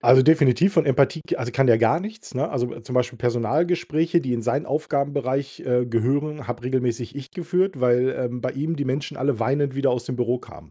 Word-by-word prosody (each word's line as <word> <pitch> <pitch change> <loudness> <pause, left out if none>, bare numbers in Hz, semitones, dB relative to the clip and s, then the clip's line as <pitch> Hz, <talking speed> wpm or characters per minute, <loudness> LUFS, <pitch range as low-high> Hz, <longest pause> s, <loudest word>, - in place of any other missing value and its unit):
Also, 130 +2 +6
definitiv 160 +4 +4
von 160 -5 +3
Empathie 140 +4 +2
k - - -2
also, 125 -1 -4
kann 135 +1 +2
der 115 -2 +6
gar 120 +8 +3
nichts, 215 -5 -9
ne? 145 +5 -1
Also, 120 -3 -3
zum 120 +2 -8
Beispiel 125 -1 0
Personalgespräche, 155 +8 +1
die 130 - -3
in 115 -1 -2
seinen 135 +6 -1
Aufgabenbereich, 140 -2 -2
äh, 125 -1 0
gehören, 135 +5 -1
habe 120 0 -5
regelmäßig 125 -1 -2
ich 140 -1 -8
geführt, 180 -2 -1
weil, 125 0 +3
ähm, 125 -1 -3
bei 125 - -2
ihm 150 +5 -3
die 145 -3 -3
Menschen 135 +3 -3
alle 135 -2 0
weinend 135 +3 0
wieder 140 0 +2
aus 125 -1 -2
dem 125 0 -4
Büro 120 0 0
kamen. - - -15
130 Hz, 215 wpm, -23 LUFS, 125-150 Hz, -, Also